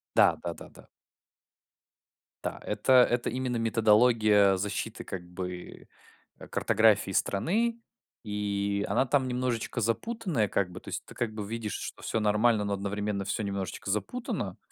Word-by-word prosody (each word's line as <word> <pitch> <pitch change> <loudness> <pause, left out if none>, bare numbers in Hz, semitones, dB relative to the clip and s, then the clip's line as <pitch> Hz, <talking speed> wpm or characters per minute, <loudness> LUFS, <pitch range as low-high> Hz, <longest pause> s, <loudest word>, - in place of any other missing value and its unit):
Да, - - +6
да-да-да. - - -8 1.6
Да, - - -4
это 130 - 0 0.2
это 120 0 0
именно 125 -1 -2
методология 110 -3 +4
защиты 100 +2 -3
как 95 - -5
бы, 90 0 -7 0.5
а, - - -11
картографии 110 -3 +3
страны. 220 - 0 0.4
И 100 -1 -1
она 130 - +2
там 130 -1 +2
немножечко 125 -2 -2
запутанная, 150 - 0
как 95 -3 0
бы, 95 - -9
то - - -14
есть - - -4
ты - - -12
как 120 -2 -2
бы 105 -2 -5
видишь, 110 -3 -4
что - - -6
всё 115 - -1
нормально, 105 +1 +3
но 100 - -2
одновременно 100 0 -2
всё 110 +3 -2
немножечко 100 -1 -4
запутано. 240 - -3
105 Hz, 140 wpm, -29 LUFS, 100-120 Hz, 1.6 s, Да